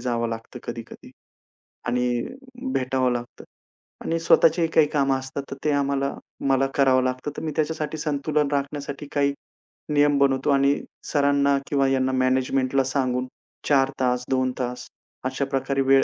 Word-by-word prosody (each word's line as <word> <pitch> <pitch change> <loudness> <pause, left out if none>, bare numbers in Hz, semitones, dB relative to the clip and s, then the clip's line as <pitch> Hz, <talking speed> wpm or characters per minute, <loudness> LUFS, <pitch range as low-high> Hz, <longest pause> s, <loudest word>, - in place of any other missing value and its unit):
जावं 120 -1 -1
लागतं 115 +2 -6
कधी-कधी 115 -1 -8 0.8
आणि 125 0 0 0.5
भेटावं 130 -1 +1
लागतं. 120 0 -6 0.6
आणि 165 0 0
स्वतःचीही 165 0 +4
काही 160 -2 +4
कामं 135 -3 +1
असतात, 135 +1 -6
तर - - -3
ते 150 - +2
आम्हाला 140 -1 0 0.4
मला 135 0 +3
करावं 130 -2 +4
लागतं. 130 +3 -2
तर - - -4
मी 155 - -2
त्याच्यासाठी 155 0 -1
संतुलन 150 0 0
राखण्यासाठी 140 0 -3
काही 140 -1 +2 0.6
नियम 145 -1 +4
बनवतो 135 0 +2
आणि 140 0 +3 0.3
सरांना 140 -1 +3
किंवा 140 -2 +2
यांना 130 -1 +1
मॅनेजमेंटला 130 +1 +1
सांगून 130 -1 -1 0.4
4 135 -2 +4
तास, 125 -1 +1
2 130 -1 +1
तास 125 0 -4 0.4
अशाप्रकारे 135 +1 -1
वेळ 135 0 +5
135 Hz, 140 wpm, -24 LUFS, 130-140 Hz, 0.8 s, वेळ